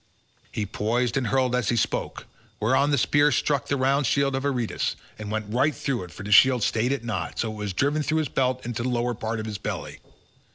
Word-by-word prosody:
He 105 - -2
poised 115 +4 -1
and 135 -4 0
hurled 130 +1 +1
as 125 -4 0
he 120 - +2
spoke, 115 - -2 0.3
whereon 130 +6 +2
the 145 - +2
spear 145 +3 +3
struck 140 -4 0
the 140 - 0
round 135 +1 +2
shield 140 0 +2
of 135 - -1
Aretus, 125 -5 -1 0.2
and 105 -1 -6
went 110 0 -3
right 140 +5 +2
through 125 -9 -2
it 90 - -14
for 95 - -9
the 105 - -5
shield 125 +2 +6
stayed 115 +3 +1
it 140 -4 -2
not, 100 -8 -4
so 115 - -1
that - - -5
it - - -9
was 105 -2 -3
driven 145 +9 +1
through 155 +1 0
his 155 -2 +1
belt 130 -1 -1
into 120 -1 -3
the 125 - -1
lower 120 0 0
part 110 0 -3
of 110 - -4
his 105 -2 -5
belly. - - -5
125 Hz, 240 wpm, -25 LUFS, 110-135 Hz, 0.3 s, shield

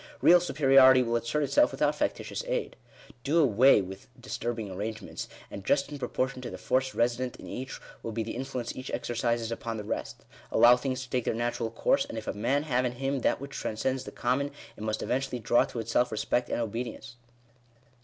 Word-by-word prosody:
Beal 175 +1 +8
supe 175 -5 -5
riority 130 -1 +7
will 115 0 0
assert 120 +6 0
itself 295 - +4
without - - +1
factitious - - -2
aid. - - -2 0.5
Do 150 +4 +1
away 130 -6 +5
with 95 +7 -9
* - - -23
disturbing 120 -4 -4
arrangements, 110 +3 -5 0.2
and, 100 - -7
just 140 +7 +1
in 145 - -6
proportion 130 +1 -2
to 125 - -5
the - - -7
force 130 0 0
resident 120 +1 0
in - - -12
each, 130 +1 -6 0.2
will 115 - -5
be 110 0 -2
the 110 - -5
influence 125 -2 -4
each 130 +1 -7
exercises 115 -1 -1
upon 115 -1 -4
the 105 - -5
rest. - - -5 0.3
Allow 120 +1 +7
things 130 +1 -3
to 125 - -12
take 125 -2 0
their - - 0
natural 120 -1 -1
course, 115 - +1
and 115 - -7
if 110 - -5
a - - -2
man 125 +8 0
j 155 - -11
have 125 0 +2
in 125 -1 -1
him 135 +2 -1
that - - +1
which 140 +1 -8
transcends 130 +4 -2
the - - -8
common, 130 +4 0 0.3
it - - -12
must 110 0 -2
event 135 +2 0
ually 125 -3 -5
draw 120 +2 +4
to 120 - -6
itself 115 +2 +1
respect 110 +3 0
and - - -1
obedience. 115 +1 -5
125 Hz, 215 wpm, -29 LUFS, 115-135 Hz, 0.5 s, Beal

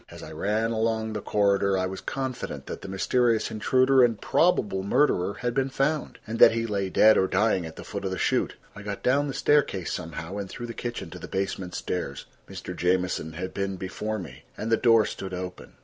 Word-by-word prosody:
As - - -11
I - - -9
ran 110 +3 0
along 110 -1 0
the 105 - -3
corridor 100 -1 +2
I 95 - 0
was 95 +1 -5
confident 130 -1 -4
that - - -7
the - - -8
mysterious 115 +4 +1
intruder 130 +4 +4
and 115 -3 +2
probable 105 - +2
murderer 100 -2 +2
had 120 -1 -2
been 135 +1 0
found, 140 +3 -1
and 110 +1 -5
that - - +8
he 115 0 -1
lay 100 -3 -1
dead 110 +4 +6
or 95 - +2
dying 95 -3 +1
at 80 - -11
the - - -9
foot - - -6
of - - 0
the 95 - -3
chute. - - 0 0.2
I 100 - -9
got 100 -1 -6
down 140 +3 +3
the 135 - -3
staircase 140 - +2
somehow, 80 +3 -5
and 100 -2 -4
through 120 - -6
the 115 - -6
kitchen 120 0 -5
to - - -8
the - - -8
basement 95 -2 -3
stairs. 70 -6 -4 0.2
Mr. - - -7
Jamieson 90 -2 0
had 95 +3 -5
been 100 0 -2
before 105 +4 -4
me, 75 -10 -9 0.2
and 115 - -3
the - - +6
door 115 -2 +5
stood 95 -1 -5
open. 90 0 -7
105 Hz, 215 wpm, -26 LUFS, 95-115 Hz, 0.2 s, that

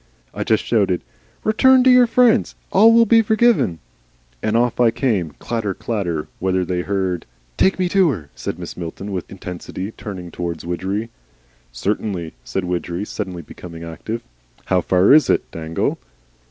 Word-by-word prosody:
I - - -3
just 110 - +1
shouted, 100 -6 +1 0.4
'Return 260 +4 +5
to 260 - +6
your 250 -1 +6
friends. 240 0 +3 0.2
All 220 +4 +7
will 230 0 +6
be 230 0 +5
forgiven.' 220 - +2 0.6
And 110 +1 +1
off 120 +1 +1
I 120 -2 +5
came, 105 - -1
clatter, 110 -5 -3
clatter. 85 -9 -3
Whether 95 -1 0
they 90 0 -1
heard 95 -2 -2
" - - -37
"TAKE 190 - +3
ME 185 -1 +1
TO 185 -1 +3
HER," 80 - -4
said - - -5
Mrs. 90 -1 -8
Milton, 90 +4 -6
with 90 -3 -4
intensity, 95 +1 -6
turning 90 -6 -8
towards 85 -2 -5
Widgery. 95 +6 -3 0.6
"Certainly," 90 - -3
said - - -3
Widgery, 90 +1 -3
suddenly 90 -4 -5
becoming 85 +1 -10
active. 95 +8 -6 0.4
"How 95 -1 +2
far 95 +7 +4
is 155 0 +6
it, - - +3
Dangle?" 80 0 -2
95 Hz, 160 wpm, -20 LUFS, 85-125 Hz, 0.6 s, All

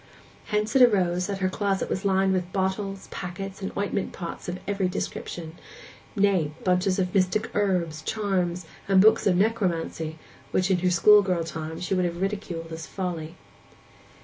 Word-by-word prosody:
Hence 210 +3 -1
it 265 - +6
arose 185 -6 +4
that 195 -1 -4
her - - +4
closet 195 0 -1
was 190 - -2
lined 190 -1 +2
with 180 -1 -2
bottles, 195 +1 -2
packets, 190 +2 -6
and 195 - -3
ointment 200 -1 -1
pots 175 0 -6
of 175 - -3
every 200 -2 0
description—nay, 180 - -3
bunches 185 +1 +2
of 180 -2 -1
mystic 190 +2 +1
herbs, 180 -6 0
charms, 180 -2 -1 0.2
and 195 -1 +5
books 215 +2 +5
of 185 - +4
necromancy, 175 -6 0 0.3
which 185 +1 +1
in 185 - +3
her 180 +1 +2
schoolgirl 185 -1 +5
time 160 0 -6
she 180 - -2
would 185 -1 +2
have 170 0 -3
ridiculed 190 -4 -3
as 160 0 -6
folly. 170 -4 -4
185 Hz, 155 wpm, -26 LUFS, 175-200 Hz, 0.3 s, it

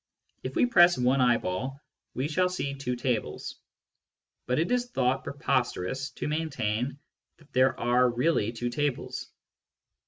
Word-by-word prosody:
If - - -5
we - - +4
press 175 - +6
one 125 +2 +3
eyeball, 120 +2 0 0.4
we 130 +3 -1
shall 180 +4 +1
see 140 -6 -3
two 135 -2 -3
tables; 120 -2 -3 0.9
but 125 +2 +1
it 165 +8 +1
is 245 0 +1
thought 130 - +1
preposterous 135 - -1
to - - -4
maintain 140 -5 -1 0.4
that 155 -2 -23
there 130 +1 +3
are 125 +1 +3
really" 120 -2 +1
two 120 +1 -3
tables. 145 0 -2
130 Hz, 135 wpm, -28 LUFS, 125-150 Hz, 0.9 s, press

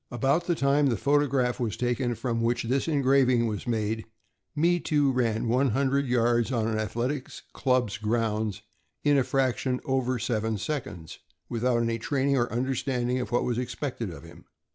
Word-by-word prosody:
About 135 +8 0
the 175 - +2
time 140 0 +3
the 120 -4 +1
photograph 140 -2 +1
was 115 -5 -2
taken 120 0 0
from 115 0 -2
which 120 +1 +1
this 130 +5 0
engraving 135 -5 +3
was 110 +1 -4
made, 110 -1 -1 0.5
Me 170 +3 +3
Too 145 -4 +2
ran 115 -3 0
one 130 +4 +2
hundred 135 +3 +1
yards 120 0 +2
on 115 -3 0
an 110 -1 -1
athletic 120 +6 -2 0.2
club's 125 -6 0
grounds 110 -1 -1 0.4
in 145 -1 +4
a 135 - +4
fraction 130 -1 0
over 130 -1 0
seven 110 -2 -1
seconds, 95 - -5 0.3
without 120 0 +1
any 115 0 -1
training 140 +3 0
or 120 -2 0
understanding 125 0 -1
of - - -4
what 120 - +2
was 120 -1 -1
expected 125 -3 -4
of 80 -5 -10
him. - - -14
125 Hz, 165 wpm, -27 LUFS, 115-135 Hz, 0.5 s, in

